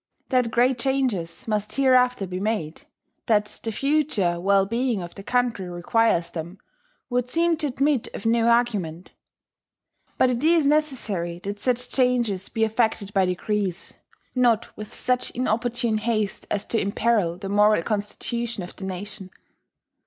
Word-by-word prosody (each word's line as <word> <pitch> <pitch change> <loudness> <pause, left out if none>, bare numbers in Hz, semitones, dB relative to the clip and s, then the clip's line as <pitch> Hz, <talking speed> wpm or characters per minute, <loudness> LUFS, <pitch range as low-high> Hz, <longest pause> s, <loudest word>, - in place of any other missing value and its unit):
That 250 -3 +2
great 245 +2 +2
changes 235 -12 -1
must 210 -1 -1
hereafter 250 -5 +3
be 185 0 -5
made, 195 -7 -3 0.4
that 210 -2 +1
the 225 - -3
future 260 - +1
well 195 +1 +3
being 235 +1 0
of 170 - -9
the - - -9
country 235 -4 0
requires 175 0 +1
them, 170 +3 -6 0.5
would 250 0 0
seem 335 +3 +2
to 305 - -1
admit 275 -1 +1
of - - -7
no 230 0 +3
argument. 210 -9 0 1.0
But 255 - +4
it 245 +2 -2
is 325 -1 +4
necessary 240 - 0
that 200 +1 -4
such 250 +2 -1
changes 240 -7 +1
be 225 - -1
effected 220 -2 0
by 190 -2 +3
degrees, 190 0 -2 0.4
not 240 -3 +2
with 215 -1 -8
such 250 0 0
inopportune 235 -2 0
haste 215 -2 -1
as 205 0 -1
to 225 - +2
imperil 200 -4 +1
the 195 +1 -6
moral 210 -2 +4
constitution 220 +1 -3
of 175 - -9
the 190 - -7
nation. 190 +1 -6
220 Hz, 145 wpm, -24 LUFS, 195-250 Hz, 1.0 s, But